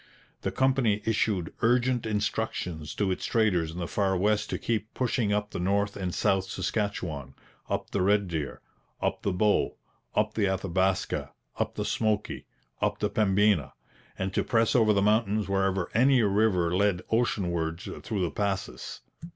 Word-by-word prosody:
The - - -2
company 130 -6 +2
issued 105 -5 0
urgent 120 0 +2
instructions 105 -7 -2
to 100 -2 0
its 90 - -3
traders 95 -8 +2
in 80 - -8
the 85 -2 -3
Far 95 -1 +1
West 105 +3 +1
to - - -1
keep 110 -2 -2
pushing 120 -4 0
up 105 0 0
the - - -4
North 100 +3 +1
and 95 -2 -3
South 95 +2 +1
Saskatchewan, 90 - -3 0.3
up - - -2
the 100 - 0
Red 100 +1 +3
Deer, 80 -4 -4 0.4
up - - -1
the 100 - 0
Bow, 105 +3 +1 0.4
up 105 0 +1
the 105 - +1
Athabaska, 95 0 0 0.3
up - - -1
the - - -2
Smoky, 105 -1 -1 0.3
up 105 0 +1
the 105 0 -1
Pembina, 100 -6 +2 0.4
and 95 0 -2
to - - +1
press 115 -2 +2
over 110 -3 +5
the 100 -1 +3
mountains 105 -1 +2
wherever 95 -2 +1
any 130 +1 +4
river 100 -4 +2
led 100 -2 +2
oceanwards 85 -7 0 0.2
through 105 -4 -2
the 85 - -1
passes. 100 -2 -3
100 Hz, 160 wpm, -28 LUFS, 95-110 Hz, 0.4 s, over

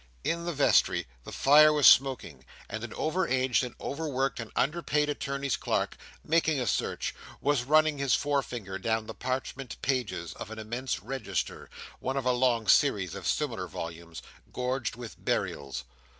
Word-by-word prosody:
In 170 0 -1
the 175 - -1
vestry 145 -1 +3 0.2
the - - -8
fire 150 +2 +6
was 150 -2 +2
smoking; 125 - +5 0.2
and 110 +2 -5
an 120 - -6
over 180 +4 0
aged 130 -1 +2
and 125 - -6
over 155 +3 -4
worked 135 -1 -1
and 115 -2 -6
under 155 +6 +1
paid 150 -2 +1
attorney's 140 -2 -2
clerk, - - -1 0.3
"making 160 -2 +2
a 125 - -1
search," - - -1 0.3
was 140 -4 +1
running 155 +1 +3
his 140 -2 +3
forefinger 120 -9 -2
down 110 -1 0
the - - -7
parchment 130 0 -4
pages 125 -10 -1
of - - -8
an 110 - -8
immense 120 +4 -3
register 130 -1 -4 0.3
(one 135 +1 -2
of 135 - -2
a 125 - +4
long 125 -3 +1
series 100 - +3
of - - -5
similar - - -1
volumes) 85 0 -7 0.3
gorged 125 -2 -2
with 120 -2 -10
burials. 70 -1 -2
130 Hz, 165 wpm, -29 LUFS, 115-145 Hz, 0.3 s, fire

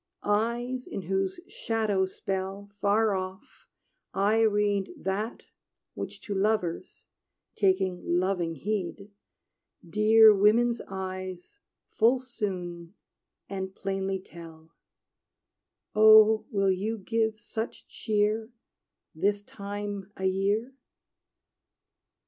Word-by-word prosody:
Eyes 235 +4 -1
in 195 - -5
whose 190 - -1
shadow 215 -4 0
spell 195 +1 -5
Far 205 +2 +3
off 185 +1 -6 0.5
I 210 +3 +3
read 205 -2 +2
That 205 +4 -3 0.5
which - - -7
to 205 - -5
lovers 195 -4 -1 0.5
taking 190 -2 +1
loving 175 -1 0
heed 200 +3 -4 0.8
Dear 215 +3 +7
women's 230 +4 +3
eyes 185 - -6 0.3
full 240 +4 +3
soon 185 -7 -5 0.5
and 190 -1 -5
plainly 195 0 -2
tell 165 -3 -13 1.2
Oh, 215 0 +7
will 195 -5 +2
you 210 +5 -2
give 220 +1 -1
such 220 +2 -6
cheer 215 0 0 0.6
This 200 +5 0
time 205 0 -6
a 190 - -3
year? 200 +6 0
200 Hz, 90 wpm, -28 LUFS, 190-220 Hz, 1.2 s, Dear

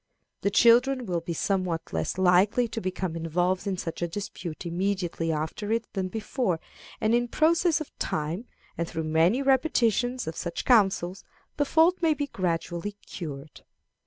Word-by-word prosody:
The 200 - +2
children 245 +4 +4
will 175 -4 -1
be 170 +1 -4
somewhat 185 -1 -1
less - - -2
likely 190 +6 +4
to 225 0 -4
become 185 -2 -3
involved 175 +4 0
in 190 -2 -1
such 165 -1 -5
a 175 - +1
dispute 175 -2 -6
immediately 175 -2 -1
after 160 +7 -3
it 230 0 +1
than 190 -2 -1
before, 210 -3 -2 0.4
and 215 +1 +1
in 240 0 +2
process 325 +4 +3
of 310 - -8
time, 160 +9 -2 0.3
and 170 - 0
through 165 -1 -4
many 165 - +2
repetitions 250 -3 +2
of 160 - -5
such 170 -1 -4
counsels, 195 -5 +3 0.3
the 290 - +2
fault 325 +5 +3
may 320 -2 +3
be 290 - -1
gradually 175 -2 -2
cured. 150 -3 -8
190 Hz, 160 wpm, -27 LUFS, 170-240 Hz, 0.4 s, children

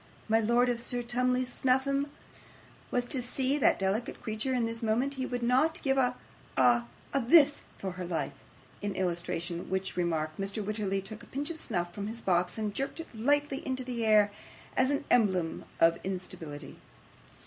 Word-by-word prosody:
My 225 0 +4
lord, 235 +3 +3
if 240 -1 0
Sir 245 0 -1
Tumley 250 +1 +1
Snuffim 265 +3 +1 0.8
was 245 0 0
to 255 +1 -2
see 265 +3 0
that - - +4
delicate 195 +5 -1
creature 220 +4 -2
at 240 -2 +2
this 230 +1 -4
moment, 235 +5 +1
he 260 -1 -3
would 245 -1 -3
not 265 +7 +3
give 270 -2 +2
a 250 -1 +2 0.4
a 120 -2 +5 0.3
THIS 285 +3 +5
for 190 - -4
her 180 0 -6
life.' 170 -2 -2 0.5
In 205 -2 -2
illustration 175 -1 -2
of - - -8
which 190 +1 -2
remark, 160 -3 0
Mr 200 +1 -2
Wititterly 200 -2 -1
took 215 +3 -7
a - - -13
pinch 290 +4 -3
of 320 - -7
snuff 175 -7 -2
from 200 +1 -4
his 225 +2 -4
box, 180 -3 +1
and 215 -2 -2
jerked 275 +8 -3
it 330 - -8
lightly 285 +4 +2
into 260 -1 -2
the 245 -2 -2
air 210 -2 +5 0.4
as 260 - +3
an 285 0 0
emblem 190 -8 +2
of 165 0 +5
instability. 175 -6 -6
225 Hz, 180 wpm, -30 LUFS, 190-255 Hz, 0.8 s, a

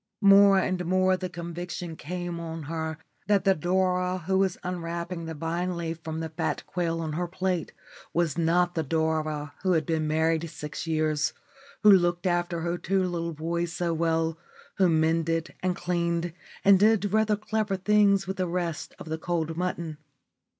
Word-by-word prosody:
More 200 0 +8
and 185 -1 0
more 185 +1 +3
the 185 0 -4
conviction 175 0 -6
came 175 +2 -5
on 165 -1 -5
her 160 +1 -3 0.3
that 205 -2 +3
the 195 - +5
Dora 180 +2 +1
who 190 +1 +2
was 190 -2 +1
unwrapping 170 -1 -4
the 160 0 -5
vine 170 +3 -2
leaf 165 -1 -4
from 160 0 -4
the 160 - -4
fat 155 - -2
quail 165 -1 -2
on 155 -2 -3
her 175 +3 -1
plate 185 -1 -2 0.4
was 170 -4 +1
not 175 +1 +2
the 165 - 0
Dora 155 -1 -1
who 185 -1 +2
had 160 -3 +1
been 160 -1 0
married 160 +1 +1
six 150 +2 -6
years, 155 -1 +1 0.5
who 210 - +9
looked 175 -2 +3
after 175 -1 0
her 170 +1 -2
two 195 0 +1
little 170 -2 -2
boys 170 +2 -2
so 175 -1 -1
well, 165 0 0 0.4
who 190 -3 +4
mended, 165 0 +1
and 185 -1 0
cleaned, 170 -1 -1 0.3
and 195 -1 +7
did 210 -1 +3
rather 215 -1 +3
clever 215 -1 -1
things 200 0 +3
with 190 0 -4
the 185 -1 0
rest 170 -2 -3
of - - -10
the 160 0 -3
cold 165 -1 -2
mutton. 170 -3 -3
170 Hz, 170 wpm, -27 LUFS, 160-185 Hz, 0.5 s, who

